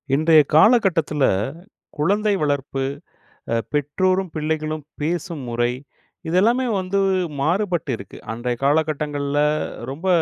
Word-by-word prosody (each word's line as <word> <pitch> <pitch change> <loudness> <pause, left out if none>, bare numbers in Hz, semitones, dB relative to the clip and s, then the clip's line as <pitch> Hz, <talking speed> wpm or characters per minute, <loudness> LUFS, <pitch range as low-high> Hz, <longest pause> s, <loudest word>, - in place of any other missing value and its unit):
இன்றைய 155 +1 +6
காலகட்டத்தில 170 - +4 0.7
குழந்தை 205 +7 +1
வளர்ப்பு 140 -2 -1 0.7
அ - - +2 0.2
பெற்றோரும், 185 +6 +1
பிள்ளைகளும் 155 0 -2 0.2
பேசும் 170 0 -2
முறை, 120 0 0 0.6
இத 165 - -1
எல்லாமே 240 +5 +3
வந்து 190 +1 -1 0.4
மாறுபட்டிருக்கு. 165 - -1
அன்றைய 120 +2 -2
காலகட்டங்கள்ல 145 -1 0 0.5
ரொம்ப 155 +8 -5
155 Hz, 95 wpm, -22 LUFS, 145-185 Hz, 0.7 s, இன்றைய